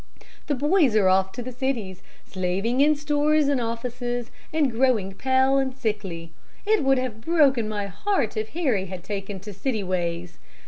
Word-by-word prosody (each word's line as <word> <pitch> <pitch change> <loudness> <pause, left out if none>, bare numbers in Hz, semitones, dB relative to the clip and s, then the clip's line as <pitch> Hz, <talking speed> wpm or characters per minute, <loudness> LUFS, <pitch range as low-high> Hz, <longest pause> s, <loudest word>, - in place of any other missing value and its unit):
The 290 - +1
boys 295 - +3
are 205 -3 +4
off 190 0 +3
to 245 - -5
the 255 - -6
cities, 235 -8 -3 0.2
slaving 195 +7 -1
in 300 +1 +5
stores 295 0 +2
and 280 -3 +1
offices, 240 +1 -3 0.2
and 305 -4 +2
growing 225 -5 +1
pale 265 +4 +2
and 265 -1 -2
sickly. 200 -9 -3 0.3
It 430 -5 +3
would 270 0 +4
have 250 -4 -3
broken 270 -7 +3
my 205 -1 -2
heart 235 - -1
if 215 0 -3
Harry 250 - 0
had 185 -1 -7
taken 195 0 -5
to 210 +1 -8
city 215 +2 -2
ways. 175 -2 -3
240 Hz, 170 wpm, -24 LUFS, 195-270 Hz, 0.3 s, in